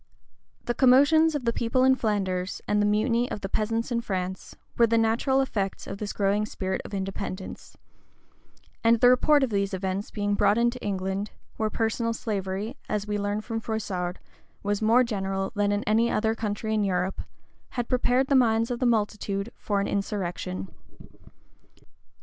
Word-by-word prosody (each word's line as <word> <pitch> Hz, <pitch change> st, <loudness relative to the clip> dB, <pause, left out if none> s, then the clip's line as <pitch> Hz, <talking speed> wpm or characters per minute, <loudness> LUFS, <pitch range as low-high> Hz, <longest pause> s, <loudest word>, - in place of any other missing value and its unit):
The 240 Hz, -, -1 dB
commotions 285 Hz, +6 st, +5 dB
of 275 Hz, -4 st, -3 dB
the 235 Hz, -, +2 dB
people 235 Hz, +3 st, +1 dB
in 265 Hz, 0 st, +6 dB
Flanders, 195 Hz, -6 st, -1 dB
the -, -, 0 dB
mutiny 230 Hz, +4 st, +1 dB
of 205 Hz, -, -5 dB
the 195 Hz, -, -3 dB
peasants 225 Hz, +4 st, -1 dB
in 235 Hz, -1 st, 0 dB
France, 185 Hz, -3 st, -4 dB, 0.2 s
were 235 Hz, -, +5 dB
the 230 Hz, +1 st, +2 dB
natural 230 Hz, +4 st, +2 dB
effects 200 Hz, -7 st, -2 dB
of 195 Hz, -, -7 dB
this 210 Hz, -1 st, -3 dB
growing 205 Hz, +1 st, +1 dB
spirit 190 Hz, -3 st, -3 dB
of -, -, -10 dB
independence; 190 Hz, 0 st, -5 dB, 1.1 s
and 230 Hz, 0 st, +5 dB
the 245 Hz, +1 st, +7 dB
report 285 Hz, +3 st, +4 dB
of 255 Hz, -, 0 dB
these 200 Hz, -1 st, 0 dB
events 190 Hz, +2 st, -3 dB
being 205 Hz, -1 st, -1 dB
brought 205 Hz, +1 st, +3 dB
into 240 Hz, +1 st, +1 dB
England, 195 Hz, +1 st, -2 dB, 0.3 s
where 220 Hz, -1 st, 0 dB
personal 230 Hz, +1 st, -1 dB
slavery, 205 Hz, +2 st, -3 dB
as 210 Hz, -1 st, -1 dB
we 210 Hz, 0 st, -2 dB
learn 205 Hz, +1 st, -1 dB
from 225 Hz, 0 st, -4 dB
Froissard,[*] 195 Hz, -5 st, -3 dB, 0.5 s
was 205 Hz, +1 st, -1 dB
more 230 Hz, +4 st, +5 dB
general 195 Hz, -4 st, -2 dB
than 205 Hz, -1 st, +1 dB
in 205 Hz, 0 st, 0 dB
any 225 Hz, +2 st, +2 dB
other 220 Hz, +1 st, +1 dB
country 220 Hz, 0 st, -3 dB
in 215 Hz, -1 st, +2 dB
Europe, 185 Hz, -1 st, -1 dB, 0.6 s
had 240 Hz, -1 st, -1 dB
prepared 255 Hz, +1 st, +2 dB
the 275 Hz, -, 0 dB
minds 230 Hz, -3 st, +3 dB
of 240 Hz, -, -2 dB
the 255 Hz, -, +2 dB
multitude 210 Hz, -2 st, -1 dB
for 205 Hz, -1 st, -1 dB
an 200 Hz, -, -1 dB
insurrection. 175 Hz, -, -3 dB
215 Hz, 165 wpm, -26 LUFS, 195-235 Hz, 1.1 s, the